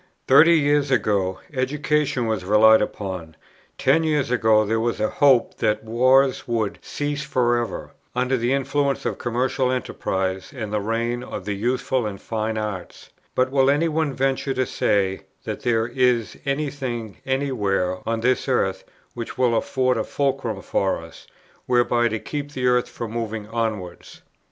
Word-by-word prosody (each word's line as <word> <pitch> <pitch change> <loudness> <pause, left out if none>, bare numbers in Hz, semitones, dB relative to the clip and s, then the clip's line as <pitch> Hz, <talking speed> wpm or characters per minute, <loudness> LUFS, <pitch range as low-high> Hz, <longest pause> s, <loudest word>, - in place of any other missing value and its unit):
Thirty 155 +6 +7
years 145 -1 +2
ago, 100 -6 +1
education 140 0 0
was 110 -4 -1
relied 110 +3 +6
upon: 95 -6 -4 0.4
ten 165 - +3
years 150 -5 0
ago 110 -3 +4
there 110 +2 0
was 115 +1 -1
a 110 - 0
hope 135 -5 +3
that 110 -1 0
wars 130 +4 +3
would 110 -4 -1
cease 145 -1 -3
for 125 -4 +1
ever, 115 - -6 0.2
under 125 +1 +1
the 120 0 0
influence 140 +1 0
of - - -2
commercial 125 +2 0
enterprise 95 -6 -2
and 110 -4 -5
the 105 - 0
reign 115 +3 -1
of - - -7
the 105 - -2
useful 125 +3 -1
and 100 -2 -6
fine 110 0 -3
arts; 105 -4 -6 0.2
but 130 0 +2
will 135 -1 +3
any 145 +4 +3
one 160 -2 0
venture 135 0 -1
to 130 0 +1
say 95 -4 0 0.2
that - - -5
there 115 -2 +1
is 120 -2 +1
any 140 +1 0
thing 120 -6 -5
any 135 +1 -1
where 95 -5 0
on 115 0 -1
this 130 +3 +1
earth, 95 -7 0 0.3
which 115 -1 -6
will 125 -2 +2
afford 130 +2 +1
a 110 - 0
fulcrum 135 -8 -2
for 95 -1 0
us, - - -13 0.4
whereby 120 -1 +3
to 110 -1 -2
keep 145 +5 -5
the 130 -2 -2
earth 125 -1 +2
from 115 -2 -6
moving 110 -2 -4
onwards? 110 -6 -4
120 Hz, 165 wpm, -23 LUFS, 110-135 Hz, 0.4 s, Thirty